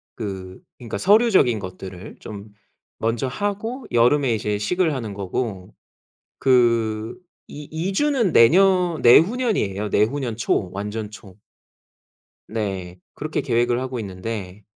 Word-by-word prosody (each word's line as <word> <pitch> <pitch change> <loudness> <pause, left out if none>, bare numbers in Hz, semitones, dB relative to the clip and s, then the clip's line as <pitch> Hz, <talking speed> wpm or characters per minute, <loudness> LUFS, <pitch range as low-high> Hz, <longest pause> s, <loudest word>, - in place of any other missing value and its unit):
그 95 -4 -6 0.2
그러니까 115 -4 -5
서류적인 195 - +4
것들을 95 +1 -9
좀 105 0 -9 0.5
먼저 115 +4 -1
하고 205 - -3
여름에 125 +2 +3
이제 105 -1 -1
식을 165 - 0
하는 115 -6 -4
거고 95 0 -4 0.7
그 115 -3 +2 0.4
이 150 - -8
이주는 195 - 0
내년 180 +6 +4
내후년이에요, 155 - +3
내후년 115 +2 0
초, 100 -4 0
완전 105 +2 -5
초. 100 -3 -13 1.1
네. 95 -5 -4 0.2
그렇게 155 +1 -3
계획을 120 0 +1
하고 130 -1 -4
있는데 100 0 -6
115 Hz, 245 characters per minute, -22 LUFS, 105-155 Hz, 1.1 s, 서류적인